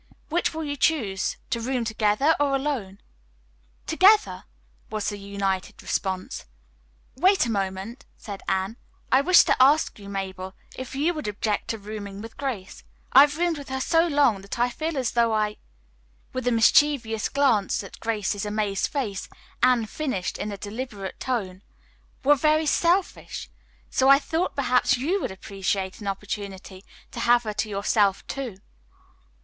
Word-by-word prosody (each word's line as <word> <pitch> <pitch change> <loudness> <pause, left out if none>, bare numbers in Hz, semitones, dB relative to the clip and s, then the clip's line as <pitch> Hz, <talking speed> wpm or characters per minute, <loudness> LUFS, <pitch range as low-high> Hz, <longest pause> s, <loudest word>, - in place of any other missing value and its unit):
"Which 345 +3 +1
will 320 0 -4
you 285 -1 -3
choose, 230 -11 0
to 235 - -1
room 250 0 -1
together 220 +7 +2
or 285 -1 +2
alone?" 260 -9 -3 0.8
"Together!" 405 +6 +4 0.4
was 215 -1 -2
the 205 -1 -6
united 195 -1 -3
response. 190 - -3 0.7
"Wait 375 +4 +4
a 235 - -2
moment," 200 +5 -4
said 200 -3 -8
Anne. 190 +4 -1 0.3
"I 260 - +6
wish 360 +5 +7
to - - +2
ask 285 -2 +4
you, 200 -1 -10
Mabel, 190 -1 -5 0.2
if 260 0 -7
you 305 +6 +1
would 305 -7 -5
object 210 0 -2
to 225 - -2
rooming 205 -1 -7
with 225 +2 -9
Grace. 245 -10 -5 0.3
I 270 - +10
have 295 +1 +4
roomed 340 -2 0
with 280 - -10
her 265 0 -2
so 330 +5 +3
long 285 - +3
that 200 +3 -7
I 245 +1 +2
feel 315 +4 -3
as 255 -3 0
though 235 -1 +2
I" 210 -1 0 0.8
with 255 -1 -3
a - - +4
mischievous 230 -1 +3
glance 250 -9 +2
at 195 - -11
Grace's 210 -3 -2
amazed 210 -2 -1
face, 220 -10 -3 0.3
Anne 250 -2 +4
finished 215 - -3
in 210 - -3
a 200 - -5
deliberate 205 -2 -6
tone 195 -8 -3 0.6
"were 290 +2 +6
very 310 +2 +2
selfish. 345 +5 0 0.4
So 265 +1 +3
I 275 - +9
thought 325 +4 -2
perhaps 255 -2 +2
you 340 +10 0
would - - -2
appreciate 190 0 -3
an 205 - -6
opportunity 195 -1 -5 0.3
to - - -7
have 240 0 +4
her 215 -2 -3
to 210 +1 -2
yourself, 200 0 +1
too." 255 -8 -5
230 Hz, 160 wpm, -25 LUFS, 200-280 Hz, 0.8 s, I